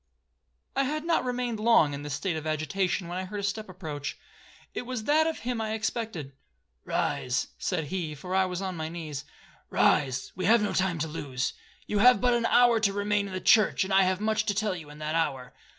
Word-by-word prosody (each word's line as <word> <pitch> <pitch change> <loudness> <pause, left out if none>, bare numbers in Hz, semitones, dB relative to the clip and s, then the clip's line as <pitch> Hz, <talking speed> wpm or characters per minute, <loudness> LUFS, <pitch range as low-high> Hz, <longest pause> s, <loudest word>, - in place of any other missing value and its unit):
'I 275 - +3
had 305 +3 -2
not 335 -1 +2
remained 245 -3 -2
long 215 -10 +4
in 140 - -5
this 145 -1 -3
state 180 +2 -2
of 155 0 -4
agitation, 175 +4 -1
when 175 +1 -4
I 185 - -3
heard 205 +2 -5
a - - -4
step 210 +1 -2
approach,—it 155 -6 -8
was 250 -2 -4
that 310 +5 +3
of 325 - -2
him 240 -1 -3
I 220 0 -1
expected. 220 - -3 0.5
'Rise,' 125 0 -1
said 180 -4 -1
he, 165 -4 -3
for 180 +6 -6
I 190 0 +4
was 185 +1 -4
on 185 -1 -3
my 160 -1 -4
knees; 155 -4 -6 0.4
'rise,—we 140 +5 +1
have 220 +2 +5
no 210 - -1
time 185 -2 +1
to 160 +1 -1
lose. 135 -5 -3 0.3
You 210 - -1
have 250 +4 +7
but 250 -1 +3
an 235 -1 +2
hour 240 -2 +5
to 210 -2 +2
remain 205 0 0
in 190 - -8
the 185 - -2
church, 215 +2 +4
and 190 +1 -3
I 195 - +6
have 185 0 +2
much 215 0 0
to 205 - +1
tell 210 -2 0
you 160 -4 -9
in 150 - -11
that 155 0 -3
hour.' 140 -6 -1
190 Hz, 215 wpm, -28 LUFS, 155-220 Hz, 0.5 s, have